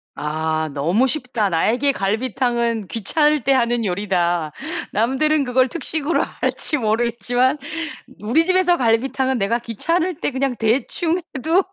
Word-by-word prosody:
아. 155 Hz, +1 st, -2 dB
"너무 170 Hz, -, +2 dB
쉽다. 245 Hz, -7 st, -1 dB
나에게 235 Hz, +11 st, +2 dB
갈비탕은 235 Hz, 0 st, -1 dB
귀찮을 295 Hz, -, +1 dB
때 275 Hz, -, +3 dB
하는 240 Hz, -2 st, +1 dB
요리다." 175 Hz, -4 st, 0 dB, 0.4 s
남들은 270 Hz, +7 st, +2 dB
그걸 255 Hz, +1 st, +2 dB
특식으로 320 Hz, 0 st, -1 dB
할지 300 Hz, -, -1 dB
모르겠지만 240 Hz, +3 st, +1 dB, 0.6 s
우리 240 Hz, +10 st, +2 dB
집에서 370 Hz, -1 st, +3 dB
갈비탕은 260 Hz, +2 st, +1 dB
내가 220 Hz, +3 st, +1 dB
귀찮을 330 Hz, -, -1 dB
때 -, -, 0 dB
그냥 265 Hz, -1 st, -1 dB
대충 280 Hz, +9 st, 0 dB, 0.2 s
해도 325 Hz, +8 st, +2 dB
245 Hz, 295 characters per minute, -20 LUFS, 215-285 Hz, 0.6 s, 때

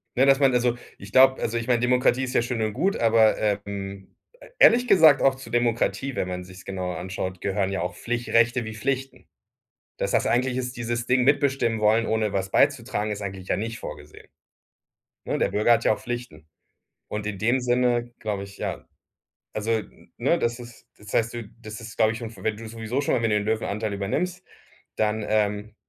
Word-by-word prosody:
Ne, 130 Hz, -, +4 dB
dass 135 Hz, 0 st, +5 dB
man 135 Hz, -2 st, +4 dB
also, 120 Hz, 0 st, +2 dB, 0.2 s
ich 100 Hz, +1 st, -12 dB
glaub 130 Hz, +2 st, +6 dB
also, 115 Hz, +1 st, -1 dB
ich 115 Hz, -, -4 dB
mein, 120 Hz, -2 st, +2 dB
Demokratie 125 Hz, +1 st, +2 dB
ist 125 Hz, -, -4 dB
ja -, -, +3 dB
schön 120 Hz, -1 st, -3 dB
und 110 Hz, -1 st, -1 dB
gut, 195 Hz, -, 0 dB
aber, 115 Hz, -1 st, +4 dB
ähm, 100 Hz, -2 st, -4 dB, 0.2 s
e -, -, -14 dB
ehrlich 245 Hz, +1 st, +6 dB
gesagt 160 Hz, -, +6 dB
auch 135 Hz, -1 st, +4 dB
zu 130 Hz, -3 st, -11 dB
Demokratie- 120 Hz, +1 st, 0 dB
wenn 90 Hz, -, -1 dB
man 90 Hz, 0 st, -4 dB
sich's 90 Hz, 0 st, -13 dB
genauer 90 Hz, -3 st, -4 dB
anschaut- 95 Hz, 0 st, -5 dB
gehören 100 Hz, -1 st, -1 dB
ja 95 Hz, -, -2 dB
auch 90 Hz, +4 st, -3 dB
Pflich 120 Hz, +1 st, -4 dB
Rechte 115 Hz, +1 st, +3 dB
wie 110 Hz, -, -6 dB
Pflichten. 135 Hz, +2 st, -3 dB, 0.7 s
Das -, -, -1 dB
das -, -, +2 dB
eigentlich 125 Hz, +1 st, +1 dB
ist 125 Hz, -1 st, -3 dB
dieses 120 Hz, 0 st, -3 dB
Ding, 125 Hz, 0 st, +3 dB
mitbestimmen 135 Hz, -5 st, +2 dB
wollen, 110 Hz, +2 st, +3 dB
ohne 110 Hz, -2 st, 0 dB
was 95 Hz, 0 st, -2 dB
beizutragen, 120 Hz, -6 st, +1 dB
ist 105 Hz, -, -5 dB
eigentlich 95 Hz, -1 st, -6 dB
ja -, -, +1 dB
nicht 115 Hz, +2 st, -4 dB
vorgesehen. 75 Hz, +1 st, -10 dB, 1.0 s
Ne, -, -, -2 dB
der -, -, +1 dB
Bürger 105 Hz, +3 st, +3 dB
hat 115 Hz, 0 st, +2 dB
ja -, -, +4 dB
auch -, -, -12 dB
Pflichten. 120 Hz, -11 st, -6 dB, 0.6 s
Und 105 Hz, 0 st, -4 dB
in 100 Hz, -2 st, -4 dB
dem 120 Hz, +4 st, +2 dB
Sinne, 120 Hz, -1 st, +1 dB
glaube 105 Hz, -2 st, -3 dB
ich, 100 Hz, 0 st, -14 dB
ja -, -, -4 dB, 0.7 s
Also, 110 Hz, +2 st, -2 dB
n 110 Hz, -2 st, -5 dB
ne, -, -, +2 dB
das 120 Hz, +1 st, -1 dB
ist 120 Hz, -1 st, -13 dB
das 105 Hz, 0 st, -11 dB
heißt, 115 Hz, +1 st, +1 dB
du 120 Hz, -1 st, -5 dB, 0.2 s
das 110 Hz, +1 st, -8 dB
ist, 115 Hz, 0 st, -10 dB
glaube 110 Hz, -1 st, +3 dB
ich, 115 Hz, -, -6 dB
schon 115 Hz, -2 st, -6 dB
für 100 Hz, -4 st, -14 dB
wenn 110 Hz, -1 st, 0 dB
du 115 Hz, 0 st, -9 dB
sowieso 115 Hz, +3 st, -3 dB
schon 145 Hz, -, 0 dB
irgendwie 115 Hz, -3 st, +1 dB
den 105 Hz, 0 st, +1 dB
Löwenanteil 110 Hz, -1 st, -1 dB
übernimmst, 180 Hz, -, -2 dB, 0.5 s
dann, 110 Hz, 0 st, 0 dB
ähm 105 Hz, 0 st, 0 dB
115 Hz, 205 wpm, -25 LUFS, 105-125 Hz, 1.0 s, glaub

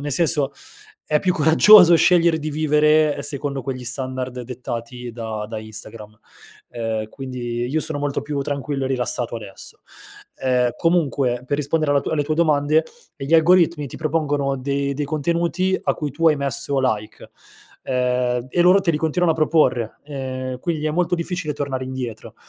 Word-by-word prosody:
nel 145 Hz, 0 st, -3 dB
senso, 145 Hz, -2 st, +1 dB, 0.6 s
è 150 Hz, -1 st, +2 dB
più 185 Hz, -, +1 dB
coraggioso 175 Hz, +4 st, +7 dB
scegliere 170 Hz, -1 st, +4 dB
di 155 Hz, 0 st, -4 dB
vivere 150 Hz, 0 st, +2 dB
secondo 140 Hz, -1 st, -4 dB
quegli 130 Hz, -1 st, -5 dB
standard 130 Hz, +1 st, -4 dB
dettati 120 Hz, 0 st, -6 dB
da 110 Hz, -2 st, -5 dB
da 110 Hz, -1 st, -5 dB
Instagram, 110 Hz, 0 st, -9 dB, 0.5 s
uhm, 110 Hz, -2 st, -3 dB
quindi 120 Hz, -2 st, -5 dB
io 150 Hz, +5 st, -1 dB
sono 155 Hz, -1 st, -2 dB
molto 145 Hz, -1 st, -2 dB
più 145 Hz, 0 st, -3 dB
tranquillo 140 Hz, 0 st, -3 dB
e -, -, -1 dB
rilassato 125 Hz, -2 st, -2 dB
adesso. 100 Hz, -4 st, -10 dB, 0.6 s
Ehm, 125 Hz, -2 st, +1 dB
comunque, 140 Hz, -8 st, +1 dB
per 145 Hz, -, 0 dB
rispondere 150 Hz, +1 st, 0 dB
alla 140 Hz, -, +3 dB
tua -, -, -4 dB
alle 150 Hz, -2 st, +1 dB
tue 155 Hz, +2 st, -1 dB
domande, 155 Hz, -1 st, +2 dB, 0.3 s
ehm, 135 Hz, -, -6 dB
gli 165 Hz, -, +3 dB
algoritmi 170 Hz, -2 st, +4 dB
ti -, -, -9 dB
propongono 145 Hz, -3 st, -1 dB
dei 140 Hz, +1 st, -2 dB
dei 145 Hz, +2 st, -2 dB
contenuti 170 Hz, +5 st, 0 dB
a -, -, 0 dB
cui 150 Hz, -2 st, -4 dB
tu 165 Hz, +5 st, +2 dB
hai 155 Hz, -, +2 dB
messo 140 Hz, 0 st, -1 dB
like. 110 Hz, -5 st, -3 dB, 0.5 s
Ehm, 125 Hz, -1 st, 0 dB
e 175 Hz, -, 0 dB
loro 180 Hz, +3 st, +6 dB
te 185 Hz, -3 st, +1 dB
li 155 Hz, -, 0 dB
continuano 160 Hz, +2 st, +1 dB
a -, -, -5 dB
proporre. 150 Hz, -8 st, +1 dB
Ehm, 130 Hz, -3 st, -5 dB
quindi 155 Hz, +1 st, -3 dB
è -, -, 0 dB
molto 175 Hz, +2 st, 0 dB
difficile 175 Hz, -2 st, -3 dB
tornare 135 Hz, -2 st, -3 dB
indietro. 125 Hz, -4 st, -6 dB
140 Hz, 170 wpm, -21 LUFS, 125-155 Hz, 0.6 s, coraggioso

